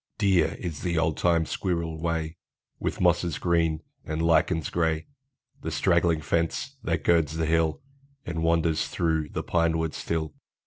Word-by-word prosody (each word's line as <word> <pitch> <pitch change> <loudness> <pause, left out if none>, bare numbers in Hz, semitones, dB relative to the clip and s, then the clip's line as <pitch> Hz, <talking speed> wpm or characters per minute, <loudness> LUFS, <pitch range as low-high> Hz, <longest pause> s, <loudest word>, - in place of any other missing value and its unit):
Dear 95 -6 +3
is 85 -6 -5
the 85 -2 -1
old 80 -1 +1
time 85 -2 +2
squirrel 85 -4 -2
way, 80 -1 -2 0.4
With - - -2
mosses 85 -2 +2
green 80 -2 +1 0.2
and 80 0 -4
lichens 80 0 +2
gray, 80 -1 0 0.6
The - - -3
straggling 85 -2 +2
fence, 85 +1 -1
that - - -1
girds 80 -2 +2
the 80 - 0
hill, 80 +2 +1 0.4
And 80 -2 -3
wanders 80 -1 +2
through 80 -3 0
the - - -4
pine 85 -1 +1
woods 80 -1 -2
still. 80 -2 -2
80 Hz, 150 wpm, -27 LUFS, 80-85 Hz, 0.6 s, Dear